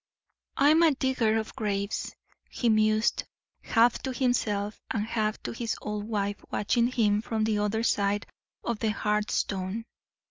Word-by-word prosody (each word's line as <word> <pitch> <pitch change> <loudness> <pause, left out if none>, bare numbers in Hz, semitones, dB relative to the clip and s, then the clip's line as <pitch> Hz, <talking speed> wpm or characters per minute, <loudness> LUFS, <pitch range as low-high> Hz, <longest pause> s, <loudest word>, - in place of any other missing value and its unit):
"I'm 300 +4 +5
a 320 -4 +5
digger 250 -5 +1
of 220 0 -4
graves," 200 -1 -2 0.3
he 240 - 0
mused, 215 0 +3 0.4
half 235 +1 +3
to 265 - -3
himself 220 -5 0
and 210 -1 -1
half 215 -1 -1
to - - -3
his 230 0 -3
old 210 -1 -4
wife 205 -2 -2
watching 235 +3 +1
him 215 -4 +2
from 220 -1 -2
the 215 -1 +1
other 210 +2 0
side 205 -2 +1 0.4
of 235 -3 -2
the 220 - 0
hearthstone. 210 -1 -1
215 Hz, 145 wpm, -28 LUFS, 210-235 Hz, 0.4 s, I'm